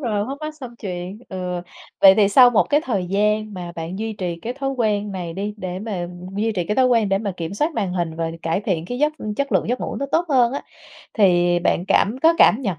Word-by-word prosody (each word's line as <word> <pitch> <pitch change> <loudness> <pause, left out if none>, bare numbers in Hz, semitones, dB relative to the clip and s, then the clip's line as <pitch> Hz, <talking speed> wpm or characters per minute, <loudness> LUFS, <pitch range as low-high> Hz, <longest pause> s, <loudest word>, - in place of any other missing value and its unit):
rồi, 215 -6 -1
khuất 275 +2 -5
mắt 305 0 -4
xong 250 -4 -9
chuyện. 185 -1 -6
Ừ, 180 -1 -4 0.4
vậy 195 -1 +9
thì 205 -2 +4
sau 250 +3 +7
một 230 - +4
cái 295 +1 +4
thời 200 -8 -1
gian 210 +2 0
mà 175 -1 -6
bạn 165 +4 -5
duy 220 0 -3
trì 180 -4 -3
cái 240 - -3
thói 270 0 -2
quen 210 -5 -1
này 175 -3 -5
đi 205 +2 -4
để 185 -2 -5
mà 190 -5 -4 0.3
duy 220 +2 0
trì 180 -4 -2
cái 210 - -2
thói 260 -1 +5
quen 230 -5 +3
để 195 0 +2
mà 200 -3 -3
kiểm 165 +3 -5
soát 300 +9 0
màn 185 -3 -1
hình 170 -3 -2
và 165 -1 -2
cải 165 +4 0
thiện 180 -6 -2
cái 245 +1 -4
giấc 300 +1 +2 0.2
chất 280 0 -1
lượng - - +1
giấc 250 - -1
ngủ - - -4
nó 280 - -2
tốt 335 +2 +3
hơn 250 -4 +3
á, 280 - -4 0.5
thì 175 -4 +4
bạn 175 0 +1
cảm 220 +5 +3
có 330 +1 +6
cảm 230 - +6
nhận 190 -9 -2
205 Hz, 255 wpm, -21 LUFS, 180-245 Hz, 0.5 s, vậy